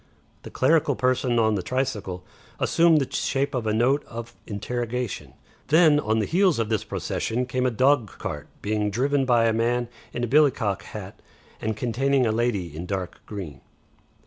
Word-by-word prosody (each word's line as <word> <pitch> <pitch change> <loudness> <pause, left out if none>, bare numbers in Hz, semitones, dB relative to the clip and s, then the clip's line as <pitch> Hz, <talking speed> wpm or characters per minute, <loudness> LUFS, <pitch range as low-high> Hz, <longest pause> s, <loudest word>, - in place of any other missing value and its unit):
The - - -9
clerical 150 +1 +2
person 125 -1 +1
on 110 -1 +3
the 100 - -1
tricycle 110 -6 -3 0.4
assumed 165 -2 +4
the 135 - -3
shape 140 +1 0
of 120 -4 -2
a - - +2
note 125 +6 +2
of 115 0 -8
interrogation. 120 +2 -4 0.3
Then 155 +1 +5
on 110 -5 0
the 110 - +1
heels 185 -1 +3
of 115 -2 -1
this 110 -3 0
procession 125 +3 -2
came 125 0 0
a - - +3
dogcart 120 - 0 0.2
driven 110 +7 0
by 120 -2 +4
a 115 - +3
man 120 +1 0 0.2
in 120 - -4
a - - +1
billycock 125 - +2
hat - - -9 0.4
and 110 -1 -2
containing 130 +3 +1
a 110 - +2
lady 105 -8 -1
in 85 +3 -6
dark 95 -2 -4
green. 85 -11 -7
120 Hz, 165 wpm, -25 LUFS, 110-135 Hz, 0.4 s, Then